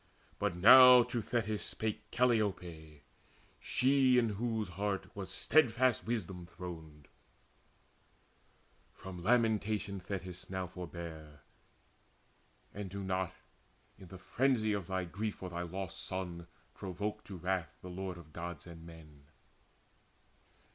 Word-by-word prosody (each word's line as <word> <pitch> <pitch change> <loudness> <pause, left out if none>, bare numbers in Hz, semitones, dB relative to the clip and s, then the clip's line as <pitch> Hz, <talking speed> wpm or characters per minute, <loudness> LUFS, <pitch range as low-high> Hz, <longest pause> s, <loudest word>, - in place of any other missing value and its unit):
But 105 -4 0
now 125 +6 +10
to 120 -1 -3
Thetis 110 -2 -1
spake 110 -1 -4
Calliope, 90 -11 0 0.6
She 130 -1 +3
in 115 -2 +3
whose 110 -1 -2
heart 100 +2 -3
was 95 -2 -6
steadfast 130 +1 +3
wisdom 95 -6 -3
throned: 80 -4 -9 1.9
"From 95 -2 -8
lamentation, 110 -2 +1
Thetis, 90 -1 -6
now 95 -1 -2
forbear, 85 -4 -8 1.3
And 100 -1 -5
do 100 +1 -5
not, 95 -1 -1 0.7
in 95 - -12
the 95 - -10
frenzy 110 +2 +1
of 100 -4 -3
thy 95 -1 -1
grief 105 +5 -3
For 90 -1 -7
thy 85 0 -3
lost 95 +2 -5
son, 90 -2 -5 0.3
provoke 105 +3 -4
to 95 - -8
wrath 90 -5 -2
the 90 - -7
Lord 95 0 -5
Of 80 -3 -14
Gods 85 -2 -6
and 85 -2 -11
men. 75 -4 -14
95 Hz, 120 wpm, -34 LUFS, 85-110 Hz, 1.9 s, now